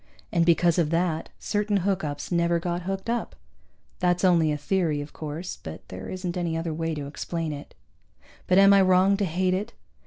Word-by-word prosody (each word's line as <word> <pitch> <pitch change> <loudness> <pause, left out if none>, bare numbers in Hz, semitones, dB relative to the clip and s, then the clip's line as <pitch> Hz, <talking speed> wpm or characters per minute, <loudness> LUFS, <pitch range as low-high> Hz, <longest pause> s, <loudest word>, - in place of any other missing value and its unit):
And 170 -1 +2
because 170 0 +4
of 160 -3 +2
that, 165 -1 0
certain 205 -1 0
hookups 160 -7 -2
never 170 0 +2
got 175 +1 -2
hooked 195 +1 -3
up. 235 0 -2 0.6
That's 180 0 +1
only 165 -4 +4
a 150 - -1
theory, 160 -1 0
of 145 +1 -7
course, 155 +4 -6
but 90 +4 -9
there 95 0 -7
isn't 185 -1 -4
any 170 -2 -1
other 165 -1 -2
way 165 0 -2
to 145 -1 -5
explain 160 +2 -4
it. 145 0 -10 0.7
But 185 - +4
am 195 0 +8
I 200 - +6
wrong 185 +1 +4
to 200 - 0
hate 185 +2 0
it? 205 +5 -3
170 Hz, 190 wpm, -26 LUFS, 155-185 Hz, 0.7 s, am